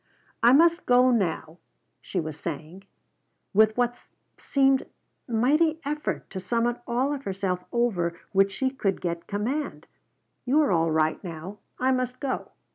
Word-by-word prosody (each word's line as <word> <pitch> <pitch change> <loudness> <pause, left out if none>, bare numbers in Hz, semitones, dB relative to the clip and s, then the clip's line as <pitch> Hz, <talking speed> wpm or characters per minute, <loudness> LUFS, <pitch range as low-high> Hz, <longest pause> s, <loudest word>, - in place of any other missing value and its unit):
"I 235 - +6
must 335 +5 +4
go 250 +1 +5
now," 175 -6 -1 0.4
she 185 - -3
was 155 -2 -4
saying, 165 +4 -6 0.7
with 215 +2 +4
what 245 0 0 0.3
seemed 270 -1 +2 0.4
mighty 300 +8 +2
effort 215 - -3
to 190 - -4
summon 235 +4 0
all 255 +4 0
of 275 -1 -5
herself 190 -2 -2
over 185 -9 0
which 195 0 +3
she 260 +5 -1
could 200 -8 -1
get 170 -1 -4
command. 245 +9 -3 0.6
"You 270 +5 +3
are 285 - +1
all 165 -2 +2
right 155 +2 +1
now. 180 +3 -7 0.2
I 260 +1 +2
must 255 -1 -1
go." 270 -2 -3
230 Hz, 145 wpm, -26 LUFS, 180-260 Hz, 0.7 s, I